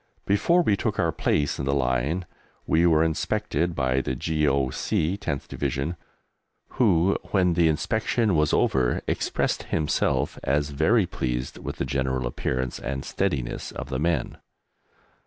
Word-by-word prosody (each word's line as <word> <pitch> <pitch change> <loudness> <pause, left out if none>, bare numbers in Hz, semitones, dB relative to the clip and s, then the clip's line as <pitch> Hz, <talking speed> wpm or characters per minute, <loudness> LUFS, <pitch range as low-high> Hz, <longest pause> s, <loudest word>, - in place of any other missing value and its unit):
Before 170 - +3
we 105 - +3
took - - -2
our - - +2
place 75 -2 0
in 70 - -2
the 70 0 +1
line 70 +7 0 0.4
we 85 +2 +3
were 80 -1 +4
inspected 80 +1 -1
by 65 0 +1
the 65 - -3
G.O.C. 75 +3 0
10th 70 -8 -3
Division, 70 +6 -2 0.7
who, 95 -6 +3
when 90 -3 +2
the 85 -1 +3
inspection 110 +5 +1
was 75 -1 +2
over, 65 -2 +2
expressed - - -1
himself 70 -2 0
as 70 +1 0
very 85 +9 +3
pleased 60 -5 -3
with - - -5
the - - -2
general 65 -2 -1
appearance 65 +1 -2
and 65 -1 -4
steadiness 65 -4 -2
of 65 - -7
the 65 -1 -2
men. 85 +2 -1
75 Hz, 140 wpm, -25 LUFS, 65-85 Hz, 0.7 s, were